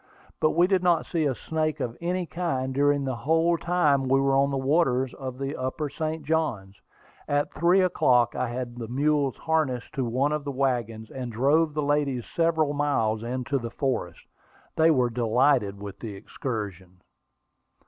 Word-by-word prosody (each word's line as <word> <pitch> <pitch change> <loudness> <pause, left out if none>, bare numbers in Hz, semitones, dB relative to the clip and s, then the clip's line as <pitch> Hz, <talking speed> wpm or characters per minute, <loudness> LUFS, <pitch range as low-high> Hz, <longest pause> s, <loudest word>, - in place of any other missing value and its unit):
But 155 - +2
we 175 - +5
did 190 -1 +2
not 175 -3 +2
see 165 -3 -1
a 135 -3 0
snake 155 +1 -2
of 115 -1 -3
any 180 +1 -1
kind 135 -7 -2
during 145 0 +2
the 130 -2 -2
whole 165 +6 +2
time 155 -6 +1
we 135 +1 +4
were 135 0 +2
on 140 +1 +3
the 140 - -1
waters 130 -2 +1
of 130 -2 -7
the 135 +2 -3
upper 130 +3 -3
St. 160 0 -3
Johns. 135 -12 -1 0.5
At 145 0 0
three 175 +4 +3
o'clock 125 -9 +3
I 125 - -1
had 120 0 -5
the 115 -2 -5
mules 140 +2 +1
harnessed 155 -7 -1
to 135 -3 -1
one 130 +5 0
of 150 -1 -2
the 140 - -4
wagons, 120 -5 -2
and 125 -2 -5
drove 145 +7 +2
the 150 - 0
ladies 140 -4 0
several 160 -3 +2
miles 135 -7 0
into 130 +3 -2
the 115 -1 -5
forest; 125 - -3 0.5
they 160 +1 +4
were 125 -6 +2
delighted 115 -3 +2
with 100 -1 -8
the 110 -4 -6
excursion. 95 -4 -6
135 Hz, 175 wpm, -26 LUFS, 120-155 Hz, 0.5 s, we